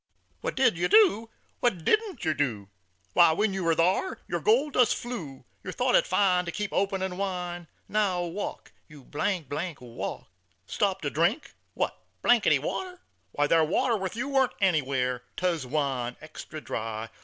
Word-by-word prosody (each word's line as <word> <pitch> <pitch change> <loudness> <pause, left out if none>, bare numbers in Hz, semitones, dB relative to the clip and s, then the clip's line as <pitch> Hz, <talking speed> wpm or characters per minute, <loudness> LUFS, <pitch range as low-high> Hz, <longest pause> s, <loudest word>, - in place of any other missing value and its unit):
"What - - -4
did - - +3
yer - - +2
do? 365 - +5 0.3
What 185 -10 0
didn't 420 - +1
yer 160 - +2
do? 115 -10 -2 0.4
Why, 170 -2 +6
when 205 +4 +1
ye 195 - -2
war 165 -3 +2
thar, 185 - +1
yer - - -2
gold 425 - +2
dust 250 -3 +4
flew, 170 - -7 0.2
Yer - - -5
thought - - 0
it - - +4
fine 180 -3 +3
to 170 - -3
keep 210 +1 -4
op'nin' 190 -2 -1
wine. 180 -3 -3 0.2
Now 195 -4 +1
walk, 175 +4 -5 0.2
you, 150 -3 -14
walk. 145 - -3 0.4
"Stop 195 - 0
to 145 - -2
drink? 175 - 0 0.2
What - - -2 0.2
water? 365 -1 +2 0.3
Why, 145 - +2
thar 165 +1 +4
Water 230 +10 +1
with 190 -2 -3
you 240 +5 -2
warn't 270 -2 +2
anywhere. 135 - +1 0.2
'Twas 170 -7 -1
wine, 130 -4 -1
Extra 155 0 -9
Dry. 110 -2 -4
180 Hz, 155 wpm, -27 LUFS, 150-210 Hz, 0.4 s, Why